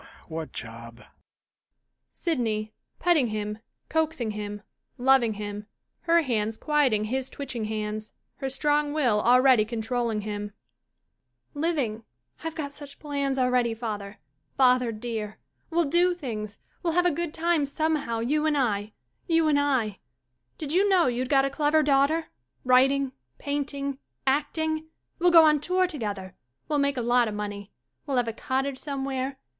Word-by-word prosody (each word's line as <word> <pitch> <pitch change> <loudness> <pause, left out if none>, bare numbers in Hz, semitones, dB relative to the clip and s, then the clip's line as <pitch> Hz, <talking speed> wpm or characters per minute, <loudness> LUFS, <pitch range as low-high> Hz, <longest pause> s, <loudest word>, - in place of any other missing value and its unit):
"] - - -24
What 160 -1 -5
job? 115 +1 -9 1.1
SYDNEY 220 - -1 0.3
^Petting 330 -8 +3
him, 210 0 -3 0.3
coaxing 315 -8 0
him, 205 0 -6 0.3
loving 250 -3 +4
him, 205 0 -6 0.3
her 335 0 +3
hands 220 -4 -1
quiet 295 -4 +2
ing 210 -1 +1
his 260 +4 -2
twitching 250 -6 -5
hands, 215 0 -4 0.3
her 270 - -3
strong 295 +2 +1
will 245 -9 +2
already 250 -1 +5
con 225 +1 -4
trolling 230 -1 -1
him,] 205 0 -5 1.0
Living. 285 -8 -1 0.4
I've 325 0 -4
got 285 -3 -4
such 285 -1 -10
plans 280 -2 -2
already, 250 -2 +2
father 210 -3 -5 0.2
— 140 - -46
father, 250 -2 +4
dear! 215 -1 -5 0.3
We'll 340 0 +2
do 350 +4 +3
things. 215 - -5 0.2
We'll 335 -2 0
have 355 +1 +3
a 355 - +4
good 335 +1 -2
time 325 -2 +1
somehow, 285 -6 -1
you 300 +6 +1
and 300 -1 +2
I 210 -5 0 0.2
— - - -45
you 330 -2 +3
and 290 -2 +4
I. 255 -8 0 0.6
Did 300 -1 -4
you 395 +3 +4
know 365 -3 +5
you'd 250 +1 -1
got 275 -2 +4
a - - 0
clever 300 +2 +2
daughter? 290 +3 +2 0.3
Writing 265 +2 +4
— 120 0 -49
paint 285 0 -1
ing 275 -1 -3
— - - -50
acting! 315 +3 0 0.3
We'll 355 +1 +5
go 335 -2 +8
on 300 -1 +5
tour 365 +5 +2
together. 205 - -4 0.3
Well 295 -1 +1
make 280 -1 +1
a 245 - -1
lot 240 0 +3
of 210 - -4
money. 205 -1 -5 0.4
We'll 275 -2 0
have 245 -1 +2
a 230 - -2
cottage 265 +3 -2
some 275 -2 -4
where. 265 0 -3
265 Hz, 165 wpm, -26 LUFS, 215-300 Hz, 1.1 s, go